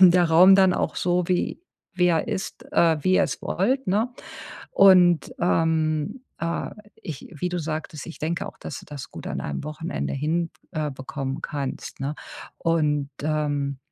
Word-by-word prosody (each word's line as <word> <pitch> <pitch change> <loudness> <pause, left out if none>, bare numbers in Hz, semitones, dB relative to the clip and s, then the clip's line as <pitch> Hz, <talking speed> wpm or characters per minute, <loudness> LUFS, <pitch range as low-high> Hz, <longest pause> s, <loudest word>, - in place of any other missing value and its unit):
der 180 -1 +7
Raum 175 +4 +7
dann 190 -2 +5
auch - - -1
so 180 0 +1
wie 180 - 0 0.4
wie 180 0 +4
er 165 +2 +2
ist, 215 +3 -4
äh 165 - +4
wie 185 - +4
ihr 195 - +5
es 165 - -2
wollt, 260 +9 0
ne? 220 +6 +1 0.6
Und, 180 -4 +6
ähm, 160 - +1 0.2
äh, 170 0 -2 0.3
ich 155 -5 -8
wie 180 +5 -2
du 180 - -2
sagtest, 155 -1 -4
ich 165 - -9
denke 165 +2 -2
auch, - - -12
dass - - -7
du - - -15
das 145 -3 -8
gut - - -8
an - - -3
einem 75 - -4
Wochenende 155 +3 -4
hin 160 +4 0 0.2
äh, 150 -2 -2
bekommen 135 +1 -5
kannst, 140 -2 -5
ne? 140 +3 -2 0.4
Und, 150 -4 +1
ähm, 145 -3 -1
165 Hz, 170 wpm, -24 LUFS, 150-180 Hz, 0.6 s, der